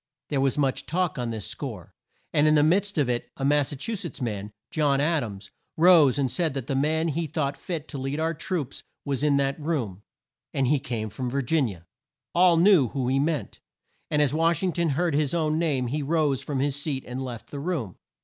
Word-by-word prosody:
There 140 -3 +1
was 135 +1 +1
much 135 -3 0
talk 175 -4 0
on 120 -1 -2
this 110 -4 -4
score, - - -6 0.4
and 150 +1 +4
in 155 - +5
the 145 - +5
midst 195 +5 +2
of 145 -4 +3
it 120 -1 -2
a 135 - -2
Mas 145 -1 +3
sa - - -5
chu 225 +12 -3
setts 175 -7 -6
man, 105 -5 -3 0.2
John 145 -3 +2
Ad 155 0 +2
ams, 100 -2 -8 0.3
rose 160 -5 +6
and 135 -3 0
said 165 -6 0
that 135 -4 -3
the 135 - -2
man 155 +4 +1
he 160 +2 -1
thought 145 -2 -1
fit 160 -2 -5
to 140 - -5
lead 135 +3 -3
our 165 +1 0
troops 165 - -4 0.2
was 140 -2 -1
in 145 -1 +3
that 140 +1 0
room, 130 - -2 0.5
and 135 - +2
he 140 +3 +3
came 115 -5 -4
from 125 +5 -3
Vir 140 +2 -1
gin 145 +1 +2
i - - -4
a. 85 - -14 0.5
All 175 -1 +5
knew 170 -6 +6
whom 130 0 -2
he 135 +1 +2
meant, 145 -7 -1 0.5
and 150 -1 +3
as 140 -2 +1
Wash 165 +2 +2
ing 180 -2 +1
ton 170 -2 +1
heard 165 +3 +1
his 150 +1 +1
own 155 -1 +1
name 145 -7 +1
he 145 +5 -2
rose 145 -2 +1
from 140 -1 -2
his 140 -1 0
seat 145 -2 -3
and 125 +2 -5
left 120 -3 -7
the 145 - -5
room. 140 - -3
145 Hz, 230 wpm, -26 LUFS, 130-160 Hz, 0.5 s, rose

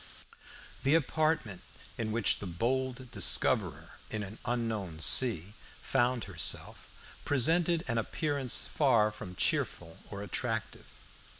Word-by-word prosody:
The 140 +4 +3
apartment 155 - 0 0.3
in 110 -2 -3
which 110 -1 +2
the 100 - -5
"bold 125 +7 -2
discoverer - - 0
in 110 -1 -3
an 100 +3 -9
unknown 110 -9 -2
sea" 100 - +4 0.3
found 125 -2 +1
herself 90 -5 -3 0.4
presented 165 +5 +3
an 120 -2 +1
appearance 140 +1 -1
far 120 -8 +3
from 95 -4 -9
cheerful 85 -1 0
or 100 0 -6
attractive. 115 +2 -3
115 Hz, 110 wpm, -31 LUFS, 105-130 Hz, 0.4 s, sea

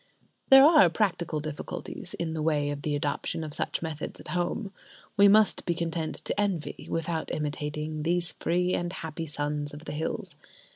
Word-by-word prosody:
There 270 +1 +10
are 305 - +7
practical 170 -5 0
difficulties 150 0 -6
in 165 -2 -3
the 160 - -2
way 150 -2 +1
of 145 0 -5
the 150 0 -1
adoption 145 +2 -2
of 155 -2 -6
such - - -2
methods 155 -2 -5
at - - -10
home. 180 +4 -2 0.4
We 200 -1 +7
must 210 +1 +5
be 170 - 0
content 165 -1 -2
to 205 - 0
envy, 190 -7 -2
without 165 0 -2
imitating, 150 +1 -3
these 170 +1 +1
free 180 +1 +1
and 175 0 -1
happy 165 -2 -5
sons 145 0 -3
of 150 +2 -11
the - - -5
hills. 155 +2 -3
160 Hz, 175 wpm, -28 LUFS, 150-175 Hz, 0.4 s, There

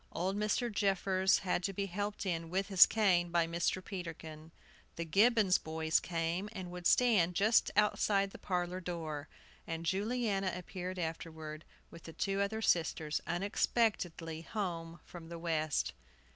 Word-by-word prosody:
Old 185 +4 -1
Mr. 215 +3 0
Jeffers 190 -2 +2
had 180 - +1
to 195 +2 -2
be 200 +1 -2
helped 205 +2 -4
in, 165 -3 -2
with 190 +3 -1
his 190 -2 +8
cane, 185 -6 +2
by 170 -1 +2
Mr. 170 +2 -1
Peterkin. 160 -4 -7 0.5
The 170 - -3
Gibbons 205 +2 +4
boys 160 0 0
came, 170 +3 -2
and 185 -4 -6
would 180 -1 -1
stand 200 -9 +4
just 215 +4 +4
outside 200 -1 +2
the - - -11
parlor 180 -1 -2
door. 160 -4 -5 0.4
And 165 0 -4
Juliana 200 0 0
appeared 180 +1 -6
afterward, 160 -2 -5 0.3
with 165 - -13
the 165 - -9
two 195 +3 -1
other 220 +2 -1
sisters, 160 -4 +1
unexpectedly 175 -3 0
home 170 -3 -4
from 165 -2 -11
the 170 - -6
West. 155 -3 -1
180 Hz, 145 wpm, -33 LUFS, 165-200 Hz, 0.5 s, his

